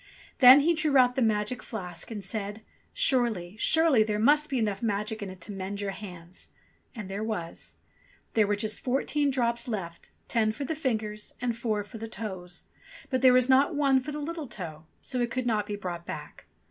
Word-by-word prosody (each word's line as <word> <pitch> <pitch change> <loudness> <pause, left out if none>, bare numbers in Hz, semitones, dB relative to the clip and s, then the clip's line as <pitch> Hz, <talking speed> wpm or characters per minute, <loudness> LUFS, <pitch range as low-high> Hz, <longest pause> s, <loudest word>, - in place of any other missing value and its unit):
Then 260 +2 +10
he 335 +4 +3
drew 305 -3 +2
out 250 -1 +5
the 260 - -1
magic 220 +2 0
flask 180 -6 -7
and 210 -3 -6
said, 205 0 -4 0.3
"Surely, 235 - +1
surely 320 -6 +4
there 215 -1 +1
must 295 +7 +3
be 270 - -1
enough 210 -4 -1
magic 215 0 -2
in 200 - -4
it 185 0 -10
to 205 - -7
mend 195 +1 -5
your 200 -1 -2
hands." 180 -3 -10 0.5
And 215 -5 -6
there 195 +3 -4
was. 200 -7 -5 0.6
There 215 -2 +3
were 205 - +1
just 215 +1 -3
fourteen 280 +3 0
drops 235 -2 0
left, 185 -7 -5 0.2
ten 220 -2 +1
for 275 +5 -5
the 320 - -2
fingers 220 -8 -3
and 245 -2 -1
four 220 -3 -1
for 220 +2 -11
the 225 - -5
toes; 185 -6 -7 0.5
but 260 -1 +1
there 260 -1 +7
was 250 0 +4
not 275 +4 +4
one 275 -2 +4
for 295 - -6
the 295 - -5
little 310 0 -5
toe, 160 -7 -8 0.2
so 255 - -3
it 240 - 0
could 255 +1 -2
not 215 -3 0
be 205 - -3
brought 175 -4 -6
back. 150 -1 -8
220 Hz, 200 wpm, -28 LUFS, 200-255 Hz, 0.6 s, Then